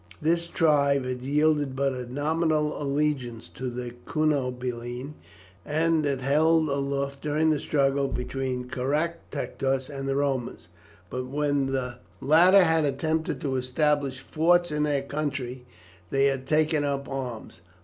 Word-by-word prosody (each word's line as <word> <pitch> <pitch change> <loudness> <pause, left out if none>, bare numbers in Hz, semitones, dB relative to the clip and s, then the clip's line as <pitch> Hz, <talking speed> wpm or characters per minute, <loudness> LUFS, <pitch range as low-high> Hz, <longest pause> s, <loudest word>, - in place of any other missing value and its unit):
This 170 +2 +1
tribe 140 -5 +2
had 125 -1 -3
yielded 145 0 +1
but 135 0 +1
a 125 -1 -6
nominal 155 +1 0
allegiance 140 -5 -1
to 130 0 -5 0.4
Cunobeline, 125 -3 -1 0.5
and 160 +2 +1
had 140 -2 -1
held 155 +4 +3
aloof 140 0 -2
during 155 +1 +2
the 150 - +1
struggle 140 -1 +1
between 125 0 -3
Caractacus 135 -1 -2
and 135 -1 -4
the 135 - 0
Romans, 135 -3 -2 0.4
but 125 0 -3
when 145 0 0
the 125 -2 -2 0.2
latter 180 - +6
had 160 -2 +3
attempted 155 +3 -1
to 135 -3 -1
establish 135 +1 0
forts 175 +3 +2
in 150 0 -1
their 145 -2 +1
country 135 -4 -4 0.4
they 135 +4 +2
had 135 -1 0
taken 155 0 +2
up 140 -1 -2
arms. 125 -9 -6
140 Hz, 130 wpm, -26 LUFS, 130-155 Hz, 0.5 s, latter